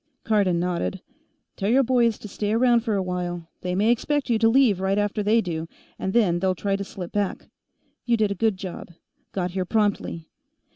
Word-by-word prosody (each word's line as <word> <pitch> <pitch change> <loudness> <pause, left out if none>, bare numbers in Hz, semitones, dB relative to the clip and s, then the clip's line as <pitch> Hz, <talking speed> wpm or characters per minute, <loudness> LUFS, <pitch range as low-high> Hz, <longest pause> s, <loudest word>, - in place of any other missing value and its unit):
Cardon 200 -6 +2
nodded. 170 - -2 0.5
"Tell 200 - -1
your 265 +4 +5
boys 235 -3 +2
to - - -9
stay 205 +1 -2
around 240 +1 +4
for 225 -2 -1
a 195 - 0
while; 175 -2 -4
they 180 0 -2
may 210 +5 +3
expect 275 +2 0
you 225 - +2
to 225 0 +5
leave 235 -6 +4
right 190 +1 +1
after 205 +1 0
they 215 +3 +3
do, 165 -4 -4 0.3
and 190 - -2
then 190 -6 +3
they'll 185 0 +1
try 195 +2 -1
to 200 - -3
slip 185 -3 -8
back. 205 -2 -2 0.6
You 235 -1 +3
did 210 -2 +1
a - - +1
good 215 0 0
job; 185 -2 -7 0.4
got 180 -2 -2
here 185 0 -1
promptly. 205 -5 -1
200 Hz, 200 wpm, -24 LUFS, 180-225 Hz, 0.6 s, your